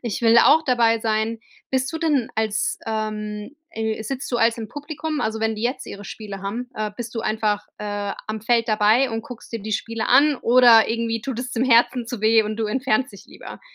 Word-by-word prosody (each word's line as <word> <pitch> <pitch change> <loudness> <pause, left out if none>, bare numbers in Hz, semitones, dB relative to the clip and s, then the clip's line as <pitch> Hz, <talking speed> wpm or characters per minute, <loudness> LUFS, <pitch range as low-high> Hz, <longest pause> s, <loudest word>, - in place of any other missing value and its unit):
„Ich 235 -2 -3
will 230 0 +5
auch 310 +6 +6
dabei 235 -3 +3
sein.” 220 +1 -1 0.3
Bist 260 0 0
du 320 - -3
denn 295 -8 +1
als, 215 -1 -1
ähm, 215 +2 -4 0.2
äh 220 0 -3
sitzt 265 +4 -5
du, 240 - 0
also, 230 0 +2
im 220 - -5
Publikum, 300 +1 -5
also, 220 0 -2
wenn 220 0 0
die 215 - -7
jetzt 250 +3 -2
ihre 200 0 -9
Spiele 200 -3 -8
haben? 235 +5 -4
Äh, 215 -1 -3
bist 240 -1 -7
du 225 - -2
einfach, 215 -1 -1
äh, 205 -1 -3
am 215 0 -4
Feld 230 0 +2
dabei 215 +5 +3
und 225 0 -3
guckst 240 -1 -11
dir 230 - -4
die 215 +2 -6
Spiele 225 +2 -3
an 295 +1 +5
oder 240 -2 +6
irgendwie 230 0 -1
tut 260 -4 -4
es 250 0 -6
dem 240 - 0
Herzen 240 0 +3
zu 245 -4 -5
weh 220 0 +4
und 215 +1 -4
du 225 -1 -1
entfernst 255 0 0
dich 200 - -14
lieber? - - -11
225 Hz, 220 wpm, -22 LUFS, 215-245 Hz, 0.3 s, auch